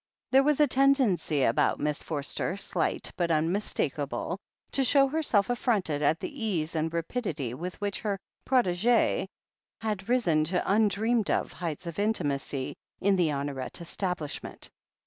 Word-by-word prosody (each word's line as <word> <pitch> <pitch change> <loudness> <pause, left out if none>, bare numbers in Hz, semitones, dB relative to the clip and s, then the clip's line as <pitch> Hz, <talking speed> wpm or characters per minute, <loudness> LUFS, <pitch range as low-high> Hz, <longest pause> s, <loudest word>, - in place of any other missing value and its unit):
There 265 +1 +7
was 295 +1 +2
a 300 - +7
tendency 255 - +3
about 115 - +2
Miss 150 0 -1
Forster, 155 +4 -2
slight - - -1
but 175 -2 +1
unmistakable, 160 -1 -1 0.3
to 270 - +2
show 275 +1 +5
herself 270 -9 +1
affronted 210 - 0
at 150 +2 +2
the 285 -8 -6
ease 165 -7 -1
and 160 0 0
rapidity 165 - -2
which 175 +8 -5
which 205 -1 -2
her 205 -2 -1 0.3
protegee 235 -2 +2 0.5
had 210 -2 -3
risen 175 -12 +3
to 180 +3 0
im 220 0 +5
dreamed 220 +2 +1
of - - 0
heights 165 -1 -4
of 170 +1 -5
intimacy 145 -10 -1 0.2
in 200 0 +3
the 175 -3 +3
Honoret 140 -2 -3
estab 180 +2 -2
lishment. 150 -4 -6
185 Hz, 145 wpm, -28 LUFS, 155-225 Hz, 0.5 s, There